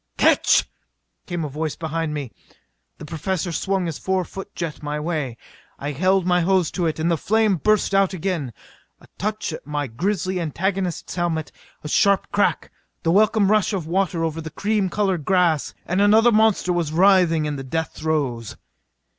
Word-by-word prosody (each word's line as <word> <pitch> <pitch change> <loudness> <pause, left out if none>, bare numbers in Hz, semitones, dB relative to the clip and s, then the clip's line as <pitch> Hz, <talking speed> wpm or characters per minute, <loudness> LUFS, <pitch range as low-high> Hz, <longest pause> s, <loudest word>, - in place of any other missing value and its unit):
"Catch!" - - +4 0.6
came 175 -3 -3
a - - -2
voice 150 +2 -3
behind 160 -1 -3
me. 140 -5 -5 0.7
The - - -9
Professor 170 +3 -3
swung 190 +2 -1
his 165 -3 -4
four 190 -1 0
foot 195 +3 -9
jet 165 -3 -4
my 150 0 -3
way. 150 -7 -3 0.4
I 145 +1 -4
held 185 +5 +2
my 180 -1 +3
hose 180 -1 +2
to 175 -3 -1
it, 160 - -2
and 160 +2 0
the 165 - +2
flame 215 0 +2
burst 215 +4 +1
out 195 -1 +3
again. 175 -7 -3 0.5
A - - -18
touch 210 -4 -2
at - - -9
my 145 -1 -2
grisly 185 - -2
antagonist's 180 +2 -2
helmet 165 -3 -2 0.3
a - - -5
sharp 200 +5 +2
crack 205 0 0 0.3
the 165 - +2
welcome 210 +1 +3
rush 215 0 +2
of 185 -5 -2
water 175 0 0
over 165 0 -2
the 160 - -6
cream 205 +4 0
colored 190 -4 0
grass 175 -4 +1
and 185 +3 0
another 220 +3 +5
monster 215 -4 +3
was 170 -3 -1
writhing 175 -2 +4
in 150 -1 -2
the 135 - -6
death 160 +5 -2
throes! 140 -8 -2
175 Hz, 175 wpm, -22 LUFS, 155-195 Hz, 0.7 s, another